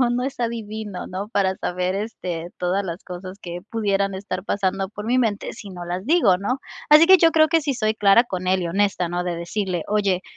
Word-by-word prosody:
no, 245 -2 +3
no 245 +1 0
es 270 -1 -5
adivino, 220 -4 -4
¿no? 190 +3 -5
Para 195 -4 +1
saber, 180 +1 -2
este, 180 -5 -4
todas 180 +3 0
las 170 0 -6
cosas 185 +1 -8
que 175 -2 -7
pudieran 200 -3 0
estar 190 -1 -5
pasando 195 -1 -1
por 210 +1 -8
mi 245 - +2
mente 215 -4 -1
si 205 -2 -10
no 175 -2 -7
las 180 +2 -4
digo, 280 - +4
¿no? 230 +7 -1 0.3
Así 305 +2 +8
que 380 0 +8
yo 330 0 +5
creo 315 -1 +5
que 325 +1 +2
sí 285 -2 -1
soy 215 -2 0
clara 210 +2 +5
con 185 -5 -4
él 185 0 +2
y - - -2
honesta, 190 0 0
¿no? 175 +1 -2
De 175 -1 -3
decirle: 175 0 -3
"Oye, 200 -3 +1
200 Hz, 225 wpm, -22 LUFS, 185-225 Hz, 0.3 s, Así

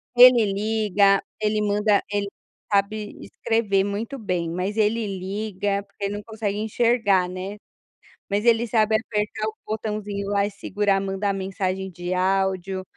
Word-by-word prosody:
Ele 245 -2 +8
liga, 205 -2 +2 0.2
ele 215 0 +1
manda 210 0 +2
ele 205 -1 0 0.4
sabe 205 +1 0
escrever 210 -4 0
muito 215 +7 -4
bem, 180 -6 -2
mas 185 +5 -3
ele 220 +1 +1
liga, 200 +1 -2
porque 200 0 -12
ele 200 - -2
não 205 - -5
consegue 215 -2 -3
enxergar, 220 -4 +2
né, 185 +3 -6 0.7
mas 205 +2 0
ele 235 0 +4
sabe 220 -1 +3
apertar 215 0 -2
o 215 - -5
botãozinho 210 -2 -3
lá 200 -1 +2
e - - -4
segurar 200 0 0
mandar 195 +1 -1
mensagem 190 0 -3
de 175 0 -5
áudio, 190 0 0
205 Hz, 145 wpm, -24 LUFS, 195-215 Hz, 0.7 s, Ele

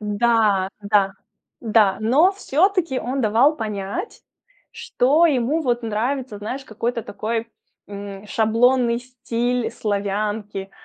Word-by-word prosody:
да, 210 -2 +2
да, 200 -1 +2 0.5
да, 215 -4 +3
но 285 - +4
всё-таки 360 -5 +1
он 260 +3 -2
давал 235 +8 +3
понять, 215 - -5 0.5
что 295 +7 +2
ему 285 +2 +1
вот 240 -3 0
нравится, 230 +1 -2
знаешь, 255 +6 -5
какой-то 230 0 -3
такой, 225 +3 -4 0.4
м, 200 0 -8
шаблонный 235 +3 +2
стиль 245 -1 -2
славянки. 205 -1 -3
230 Hz, 105 wpm, -22 LUFS, 210-255 Hz, 0.5 s, но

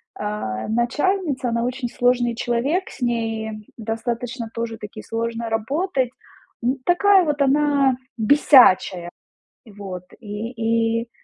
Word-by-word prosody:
а, 210 - -4
начальница, 265 - 0
она 235 0 0
очень 250 0 -3
сложный 245 -1 +1
человек, 255 +11 -1
с - - -13
ней 225 -2 -2
достаточно 230 +1 -4
тоже-таки 225 -2 -6
сложно 230 0 -3
работать, 265 - -1 0.5
ну, 250 +3 0
такая 380 +1 +5
вот 295 -1 -1
она 280 -1 +3 0.2
бесячая. 215 -8 +5 0.6
Вот 195 -4 -8 0.2
и 215 +1 -6 0.5
и 235 - -9
235 Hz, 105 wpm, -22 LUFS, 225-270 Hz, 0.6 s, такая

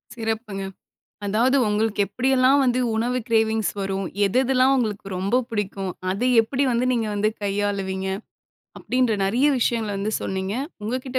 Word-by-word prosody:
சிறப்புங்க. 220 -3 -3 0.6
அதாவது 235 +7 +2
உங்களுக்கு 210 0 0
எப்படியெல்லாம் 260 +4 +3
வந்து 250 0 +2
உணவு 245 +3 0
கிரேவிங்ஸ் 220 -1 +2
வரும். 195 -1 -2 0.2
எதெதெல்லாம் 255 +4 +3
உங்களுக்கு 215 -6 -2
ரொம்ப 210 +7 +1
புடிக்கும். 195 -3 -3 0.2
அத 200 - -5 0.2
எப்படி 265 +5 -1
வந்து 240 +2 +1
நீங்க 230 -3 0
வந்து 210 +1 +1
கையாளுவீங்க, 195 -1 -1 0.7
அப்படின்ற 250 -2 +1
நிறைய 240 +9 +2
விஷயங்கள 230 -3 0
வந்து 210 +2 -2
சொன்னீங்க 190 +1 -3 0.3
உங்ககிட்ட 255 +3 -2
220 Hz, 130 wpm, -23 LUFS, 200-250 Hz, 0.7 s, எப்படியெல்லாம்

